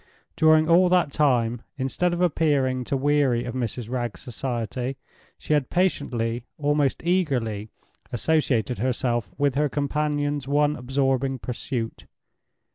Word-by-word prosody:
During 155 0 +5
all 175 +2 +5
that 180 -5 +3
time, 120 -6 +2 0.2
instead 140 +7 0
of 175 0 -2
appearing 140 -7 +1
to 135 - -1
weary 135 -4 +2
of 120 - -4
Mrs. 120 -2 -3
Wragge's 120 -2 -3
society, 125 +1 -3 0.4
she - - -2
had 145 -4 +1
patiently, 120 -10 -1
almost 145 -1 +1
eagerly, 125 - 0 0.4
associated 125 -3 +1
herself 120 -4 -1
with 140 -1 +2
her 145 +2 +1
companion's 145 0 -1
one 145 +1 +2
absorbing 135 0 0
pursuit. 120 -1 -5
135 Hz, 120 wpm, -25 LUFS, 120-150 Hz, 0.4 s, During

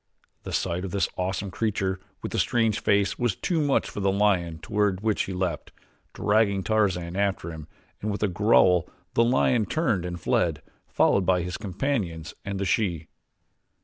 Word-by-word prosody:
The - - -7
sight 85 +2 -1
of 95 - -3
this 100 +2 0
awesome 95 +1 -2
creature 95 -2 -1 0.2
with - - -4
the - - -1
strange 115 -3 +2
face 100 -1 +1
was 120 -6 +1
too 165 -3 -1
much 145 -2 +2
for - - -6
the 100 -1 +2
lion 95 -5 +1
toward 100 +3 0
which 110 -1 +1
he - - -6
leaped, 90 -4 -3 0.4
dragging 105 -2 +2
Tarzan 95 -6 0
after 95 -4 -1
him, 80 -2 -9 0.3
and 110 - -2
with 105 0 -2
a - - +4
growl 90 -2 +4 0.2
the 115 - +4
lion 120 -2 +2
turned 115 - 0
and 90 -1 -5
fled, - - 0 0.2
followed 95 -2 +2
by 90 -2 +3
his 90 +1 -4
companions 95 - -3
and 100 -1 -4
the 100 - -1
she. 90 -6 0
100 Hz, 175 wpm, -26 LUFS, 90-105 Hz, 0.4 s, a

